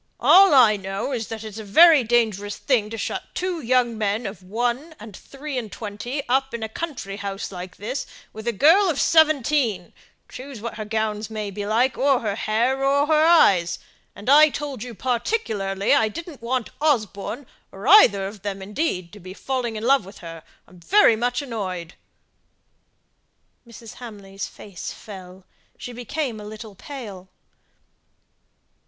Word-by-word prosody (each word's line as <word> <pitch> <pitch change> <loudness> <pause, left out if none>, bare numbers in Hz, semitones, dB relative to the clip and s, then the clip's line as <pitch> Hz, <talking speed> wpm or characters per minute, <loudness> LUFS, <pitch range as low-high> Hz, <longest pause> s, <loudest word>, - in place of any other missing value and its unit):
All 385 -5 +7
I 225 -5 +6
know 195 +6 -4
is, 230 -4 -3
that 225 -1 -7
it's 220 0 -8
a - - -6
very 305 +7 +6
dangerous 220 -4 0
thing 235 -7 0
to 225 - -6
shut - - -3
two 360 -2 -2
young 240 -2 +1
men 210 +2 -1
of 195 -1 -6
one 240 - -3
and 215 -2 -11
three 275 +2 -6
and 220 -4 -8
twenty 240 +6 -6
up 265 0 0
in 230 - -5
a - - -2
country 220 -6 -6
house 200 -1 -5
like 180 -1 -8
this 250 +7 -5 0.3
with 220 +2 -9
a - - +2
girl 330 - +5
of 295 - -1
seventeen 290 - +2 0.3
choose 260 -1 -9
what 230 +1 -6
her 215 - -5
gowns 215 0 -2
may 215 -2 -5
be 205 +1 -5
like, 240 +5 +1
or 270 -2 +3
her 210 -3 -2
hair, 235 +6 0
or 280 +1 +3
her 310 0 +3
eyes. 195 - +4 0.4
And 205 - -12
I 300 +3 +7
told 285 -4 -5
you 245 -1 -7
particularly 220 - -1
I 220 - +4
didn't 325 +3 -9
want 240 0 -2
Osborne, 230 - -1 0.3
or 195 +4 -8
either 205 - +7
of 200 0 -8
them, 200 -1 -4
indeed, 190 - -3
to 210 - -11
be 185 0 -10
falling 250 -3 -3
in 215 - -5
love 270 +1 +3
with 195 +2 -13
her. 165 -1 -9 0.3
I'm 180 +1 -17
very 355 - +4
much 245 +4 -1
annoyed." 185 -9 -5 1.7
Mrs. 230 -1 -12
Hamley's 200 -5 -8
face 195 -4 -9
fell; 185 -2 -12 0.3
she 245 - -8
became 245 0 -4
a - - -9
little 215 0 -9
pale. 200 -5 -9
225 Hz, 165 wpm, -23 LUFS, 200-270 Hz, 1.7 s, All